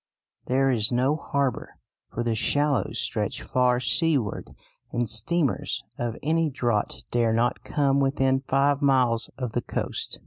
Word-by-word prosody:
There 135 Hz, +1 st, +2 dB
is 110 Hz, -2 st, +2 dB
no 130 Hz, +4 st, +2 dB
harbour, 140 Hz, -3 st, -2 dB, 0.4 s
for 120 Hz, -, -3 dB
the 120 Hz, -1 st, 0 dB
shallows 145 Hz, +1 st, +1 dB
stretch -, -, -2 dB
far 125 Hz, -1 st, +2 dB
seaward, 140 Hz, -, +1 dB, 0.4 s
and 120 Hz, -1 st, -1 dB
steamers 140 Hz, +8 st, 0 dB, 0.2 s
of 120 Hz, -2 st, -3 dB
any 160 Hz, +1 st, +1 dB
draught 120 Hz, -6 st, -2 dB
dare 115 Hz, -2 st, +2 dB
not 120 Hz, +2 st, 0 dB
come 140 Hz, -2 st, +1 dB
within 135 Hz, -1 st, +1 dB
five 140 Hz, +1 st, +2 dB
miles 125 Hz, -5 st, +2 dB
of 125 Hz, -4 st, -4 dB
the 120 Hz, -, -1 dB
coast. -, -, -4 dB
130 Hz, 140 wpm, -25 LUFS, 120-140 Hz, 0.4 s, There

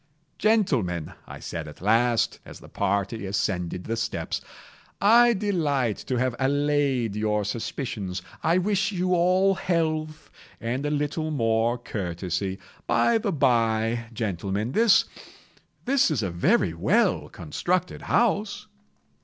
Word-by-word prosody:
"Gentlemen," 130 Hz, -, +1 dB
I -, -, -9 dB
said -, -, -6 dB
at -, -, -11 dB
last, 115 Hz, +3 st, +2 dB
as -, -, -11 dB
the -, -, -14 dB
party 100 Hz, +3 st, -1 dB
ascended 90 Hz, -2 st, -2 dB
the 115 Hz, -, -2 dB
steps, 115 Hz, 0 st, -3 dB, 0.6 s
"I 235 Hz, +3 st, +6 dB
delight 150 Hz, -, 0 dB
to 130 Hz, -, 0 dB
have 125 Hz, 0 st, 0 dB
allayed 140 Hz, -4 st, +1 dB
your 105 Hz, -1 st, 0 dB
suspicions. 105 Hz, -4 st, -4 dB, 0.2 s
I 165 Hz, +2 st, +2 dB
wish 195 Hz, +1 st, +1 dB
you 185 Hz, -1 st, 0 dB
all 185 Hz, +3 st, +3 dB
health, 160 Hz, -4 st, -2 dB, 0.3 s
and 125 Hz, +5 st, -2 dB
a -, -, 0 dB
little 150 Hz, +2 st, -1 dB
more 115 Hz, -3 st, +1 dB
courtesy. 95 Hz, -3 st, -3 dB, 0.3 s
By 235 Hz, -1 st, +3 dB
the 210 Hz, -2 st, -1 dB
bye, 115 Hz, -5 st, +1 dB
gentlemen, 105 Hz, 0 st, -2 dB
this—this 235 Hz, -, 0 dB
is 135 Hz, -8 st, 0 dB
a 95 Hz, -, -2 dB
very 85 Hz, +1 st, +2 dB
well -, -, +1 dB
constructed 175 Hz, -, -2 dB
house." 210 Hz, -2 st, 0 dB
130 Hz, 120 wpm, -25 LUFS, -, 0.6 s, I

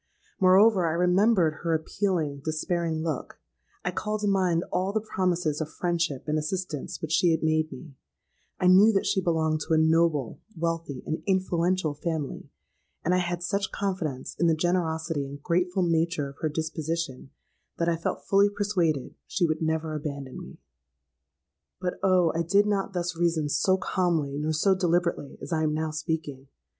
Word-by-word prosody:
Moreover, 190 Hz, 0 st, +5 dB
I -, -, -1 dB
remembered 180 Hz, -1 st, +3 dB
her 165 Hz, -1 st, +1 dB
appealing, 160 Hz, -4 st, -1 dB
despairing 160 Hz, 0 st, -1 dB
look;—I 65 Hz, -, -6 dB
called 210 Hz, 0 st, -3 dB
to 210 Hz, -, 0 dB
mind 185 Hz, -4 st, +2 dB
all 185 Hz, +2 st, +1 dB
the 220 Hz, -, +1 dB
promises 180 Hz, -7 st, -1 dB
of 155 Hz, -, -3 dB
friendship 170 Hz, -6 st, -1 dB
and 155 Hz, 0 st, +1 dB
assistance 155 Hz, -2 st, -4 dB
which 160 Hz, -, -3 dB
she 170 Hz, +2 st, +4 dB
had 160 Hz, -1 st, +1 dB
made 155 Hz, 0 st, +1 dB
me; 160 Hz, -6 st, -10 dB, 0.7 s
I -, -, 0 dB
knew 190 Hz, +5 st, +7 dB
that 195 Hz, -, +1 dB
she 190 Hz, -, +1 dB
belonged 160 Hz, -3 st, +1 dB
to 160 Hz, +1 st, 0 dB
a -, -, +3 dB
noble, 160 Hz, -4 st, +2 dB, 0.2 s
wealthy, 165 Hz, -5 st, -3 dB
and 155 Hz, -, -3 dB
influential 185 Hz, -3 st, +1 dB
family; 155 Hz, -1 st, -4 dB, 0.6 s
and 175 Hz, -, +2 dB
I 185 Hz, -, +3 dB
had 175 Hz, -1 st, -2 dB
such 200 Hz, +1 st, -1 dB
confidence 185 Hz, -10 st, -3 dB
in 170 Hz, -, +3 dB
the 165 Hz, -, +4 dB
generosity 160 Hz, -2 st, 0 dB
and 140 Hz, +1 st, -8 dB
grateful 180 Hz, +2 st, +1 dB
nature 165 Hz, -3 st, 0 dB
of 140 Hz, -, -14 dB
her 155 Hz, -, 0 dB
disposition, 160 Hz, -2 st, -3 dB, 0.5 s
that 170 Hz, -, 0 dB
I 170 Hz, -, +2 dB
felt 165 Hz, -, -4 dB
fully 200 Hz, +1 st, +4 dB
persuaded 185 Hz, -9 st, -1 dB
she 180 Hz, -, +1 dB
would 155 Hz, -1 st, -1 dB
never 160 Hz, 0 st, -1 dB
abandon 140 Hz, -3 st, -5 dB
me. -, -, -11 dB, 1.2 s
"But, 180 Hz, -1 st, -3 dB
oh! 185 Hz, -3 st, +3 dB
I 165 Hz, -, 0 dB
did 200 Hz, +5 st, +3 dB
not 200 Hz, -2 st, -1 dB
thus 175 Hz, -1 st, -2 dB
reason 165 Hz, -3 st, +1 dB
so 185 Hz, +6 st, +2 dB
calmly 165 Hz, -7 st, 0 dB
nor 155 Hz, +1 st, -1 dB
so 190 Hz, +6 st, +3 dB
deliberately 175 Hz, -5 st, 0 dB
as -, -, -4 dB
I 160 Hz, -, +1 dB
am 155 Hz, -1 st, +1 dB
now 160 Hz, 0 st, -1 dB
speaking. 155 Hz, -3 st, -4 dB
165 Hz, 170 wpm, -27 LUFS, 155-185 Hz, 1.2 s, knew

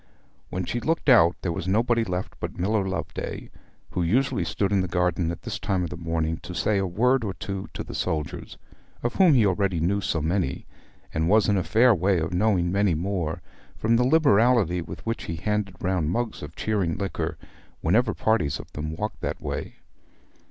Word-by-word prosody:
When 90 Hz, 0 st, -3 dB
she 120 Hz, -, -2 dB
looked 160 Hz, +3 st, 0 dB
out 90 Hz, -9 st, +6 dB
there 90 Hz, -, 0 dB
was 85 Hz, +1 st, -4 dB
nobody 115 Hz, +4 st, +2 dB
left 90 Hz, -3 st, -3 dB
but -, -, -5 dB
Miller 100 Hz, +3 st, +1 dB
Loveday, 95 Hz, -, -5 dB, 0.4 s
who 90 Hz, -, -1 dB
usually 100 Hz, +3 st, +1 dB
stood 95 Hz, +4 st, -1 dB
in 100 Hz, -2 st, +3 dB
the 95 Hz, -, -1 dB
garden 90 Hz, -1 st, 0 dB
at 85 Hz, -, -6 dB
this -, -, -4 dB
time 95 Hz, -2 st, 0 dB
of 85 Hz, -, -4 dB
the -, -, -4 dB
morning 80 Hz, 0 st, -1 dB
to 90 Hz, +1 st, -9 dB
say 105 Hz, +1 st, +1 dB
a 95 Hz, -, 0 dB
word 125 Hz, +8 st, +2 dB
or 100 Hz, -3 st, -3 dB
two 95 Hz, -1 st, -5 dB
to -, -, -3 dB
the -, -, -9 dB
soldiers, 75 Hz, -2 st, -3 dB, 0.5 s
of 120 Hz, -, 0 dB
whom 180 Hz, -7 st, +6 dB
he 115 Hz, -4 st, +5 dB
already 95 Hz, -2 st, +1 dB
knew 100 Hz, +5 st, +1 dB
so 85 Hz, -, -1 dB
many, 80 Hz, -2 st, -1 dB, 0.5 s
and 80 Hz, +2 st, 0 dB
was 110 Hz, +1 st, +4 dB
in 100 Hz, -, +3 dB
a 95 Hz, -, +1 dB
fair 120 Hz, +2 st, +5 dB
way 95 Hz, 0 st, +2 dB
of 80 Hz, +2 st, -2 dB
knowing 90 Hz, -2 st, +2 dB
many 100 Hz, -3 st, +2 dB
more, 85 Hz, -2 st, -2 dB, 0.3 s
from 115 Hz, +2 st, +2 dB
the 120 Hz, -, +3 dB
liberality 120 Hz, -, +4 dB
with -, -, -9 dB
which 115 Hz, 0 st, -3 dB
he 80 Hz, -, -4 dB
handed 105 Hz, +2 st, -2 dB
round 90 Hz, -4 st, 0 dB
mugs 115 Hz, +5 st, -2 dB
of -, -, -8 dB
cheering 100 Hz, -6 st, -1 dB
liquor 85 Hz, -4 st, -3 dB, 0.4 s
whenever 105 Hz, +7 st, +2 dB
parties 110 Hz, -11 st, +1 dB
of -, -, -11 dB
them 75 Hz, +1 st, -4 dB
walked 105 Hz, +5 st, -4 dB
that -, -, -3 dB
way. -, -, -5 dB
95 Hz, 200 wpm, -25 LUFS, 85-110 Hz, 0.5 s, out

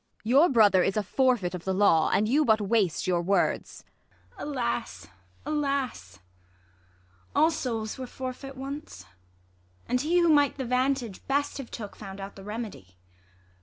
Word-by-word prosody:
Ang. 225 Hz, -, -1 dB
Your 290 Hz, +7 st, +6 dB
brother 210 Hz, -7 st, +5 dB
is 195 Hz, +3 st, 0 dB
a 210 Hz, -, +1 dB
forfeit 240 Hz, -4 st, +1 dB
of 180 Hz, -2 st, -6 dB
the 190 Hz, 0 st, -1 dB
law; 185 Hz, -5 st, +4 dB
And 215 Hz, -, +2 dB
you 285 Hz, +7 st, +3 dB
but 220 Hz, -5 st, +3 dB
waste 205 Hz, -4 st, +1 dB
your 175 Hz, -2 st, +1 dB
words. 195 Hz, +3 st, 0 dB, 0.5 s
IsAB. -, -, -28 dB
Alas, 250 Hz, -5 st, -3 dB, 0.4 s
alas! 275 Hz, -, -2 dB, 1.2 s
all 320 Hz, +2 st, +5 dB
souls 225 Hz, -6 st, -3 dB
were 255 Hz, -, -5 dB
forfeit 265 Hz, +2 st, -7 dB
once; 270 Hz, -, -7 dB, 0.8 s
And 250 Hz, 0 st, 0 dB
he 330 Hz, +5 st, +1 dB
who 340 Hz, -1 st, +4 dB
might 290 Hz, -3 st, +4 dB
the 265 Hz, -, -3 dB
vantage 250 Hz, -3 st, -1 dB
best 285 Hz, +1 st, 0 dB
have 265 Hz, -, -7 dB
took 210 Hz, -4 st, -7 dB
Found 195 Hz, -2 st, -9 dB
out 195 Hz, +1 st, -8 dB
the 195 Hz, -, -11 dB
remedy. 205 Hz, -, -7 dB
235 Hz, 160 wpm, -27 LUFS, 195-275 Hz, 1.2 s, Your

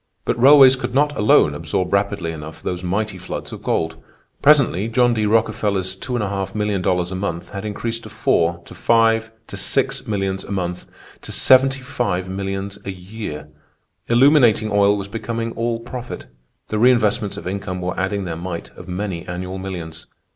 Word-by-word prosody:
"But -, -, -1 dB
railways 135 Hz, -1 st, +8 dB
could 125 Hz, -1 st, -5 dB
not 145 Hz, +1 st, +2 dB
alone 105 Hz, -, +4 dB
absorb 90 Hz, +1 st, -2 dB
rapidly 100 Hz, -4 st, 0 dB
enough 80 Hz, 0 st, -9 dB
those 90 Hz, -1 st, -3 dB
mighty 95 Hz, +2 st, -2 dB
floods 90 Hz, -, -6 dB
of -, -, -8 dB
gold. 80 Hz, -, -1 dB, 0.4 s
Presently 135 Hz, -, +4 dB
John 120 Hz, +1 st, +3 dB
D. 110 Hz, -2 st, 0 dB
Rockefeller's 105 Hz, -3 st, +1 dB
$2,500,000 95 Hz, -4 st, -1 dB
a -, -, -4 dB
month 90 Hz, -3 st, -4 dB
had 100 Hz, -, -6 dB
increased 115 Hz, +2 st, -3 dB
to 110 Hz, -, -10 dB
four, 85 Hz, -5 st, +1 dB
to -, -, -12 dB
five, 115 Hz, -1 st, +2 dB, 0.2 s
to -, -, -9 dB
six -, -, 0 dB
millions 95 Hz, -2 st, -2 dB
a -, -, -10 dB
month, 90 Hz, -2 st, -3 dB, 0.3 s
to -, -, -7 dB
$75,000,000 100 Hz, -7 st, +1 dB
a 100 Hz, -, -4 dB
year. 90 Hz, -5 st, -7 dB, 0.6 s
Illuminating 120 Hz, -4 st, +4 dB
oil 100 Hz, 0 st, +4 dB
was 100 Hz, -1 st, -5 dB
becoming 115 Hz, +2 st, -4 dB
all 115 Hz, 0 st, -2 dB
profit. 125 Hz, +1 st, -7 dB, 0.4 s
The 110 Hz, -, -1 dB
reinvestments 110 Hz, -3 st, +3 dB
of -, -, -8 dB
income 95 Hz, -1 st, -4 dB
were 90 Hz, +1 st, -3 dB
adding 100 Hz, +1 st, -1 dB
their 85 Hz, -3 st, -4 dB
mite 85 Hz, 0 st, -6 dB
of 90 Hz, -, -11 dB
many 90 Hz, -1 st, -4 dB
annual 90 Hz, +1 st, -5 dB
millions. 90 Hz, -4 st, -7 dB
100 Hz, 155 wpm, -20 LUFS, 90-115 Hz, 0.6 s, railways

